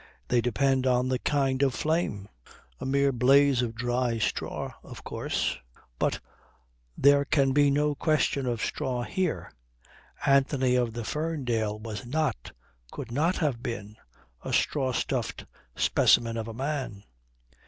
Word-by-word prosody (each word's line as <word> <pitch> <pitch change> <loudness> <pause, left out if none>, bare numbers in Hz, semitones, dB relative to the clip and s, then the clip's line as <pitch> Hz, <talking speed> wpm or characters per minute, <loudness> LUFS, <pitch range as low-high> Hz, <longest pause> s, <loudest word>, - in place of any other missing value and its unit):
They 120 -1 +3
depend 130 +2 +1
on 125 0 +2
the 130 -1 0
kind 135 -2 0
of 135 -4 +2
flame. 150 - -1 0.5
A - - -4
mere 140 +1 +2
blaze 135 +1 +4
of 115 -2 -3
dry 120 0 0
straw, 110 - -2
of - - -11
course... - - -2 0.4
but - - 0 0.8
there 140 +1 +5
can 140 -1 +2
be 145 +1 +4
no 145 +1 +2
question 145 -3 +1
of 120 -3 -1
straw 125 -2 -2
there. 185 -3 -1 0.7
Anthony 135 -2 +3
of 120 -2 +1
the 120 0 -4
Ferndale 125 -8 -2
was 110 +1 -6
not, 135 - -2 0.4
could 115 - -8
not 160 +8 +1
have 140 -8 -1
been, 105 -3 -5 0.5
a - - -5
straw 135 -3 +1
stuffed - - -2 0.3
specimen 115 -1 +3
of 115 -1 -3
a 115 - -6
man. 130 -6 -3
130 Hz, 140 wpm, -27 LUFS, 120-140 Hz, 0.8 s, there